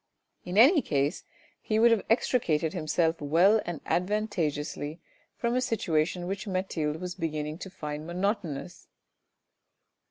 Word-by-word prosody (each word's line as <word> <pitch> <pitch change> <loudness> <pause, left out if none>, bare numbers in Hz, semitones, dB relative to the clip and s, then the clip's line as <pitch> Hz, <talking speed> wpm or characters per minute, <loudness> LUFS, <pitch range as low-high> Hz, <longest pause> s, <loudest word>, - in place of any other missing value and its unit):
In 180 +2 -4
any 285 - +7
case 145 - -1 0.4
he 215 - -1
would 235 +1 +6
have 225 -3 +3
extricated 170 -9 +1
himself 165 -1 0
well 175 +9 +4
and 175 -4 -4
advantageously 170 -6 -1 0.4
from 235 0 0
a 255 - +2
situation 175 -8 0
which 200 +4 -4
Mathilde 170 -5 -2
was 180 0 -4
beginning 155 -1 -3
to 190 - -7
find 150 -3 -6
monotonous. 175 -4 -3
175 Hz, 125 wpm, -28 LUFS, 155-210 Hz, 0.4 s, any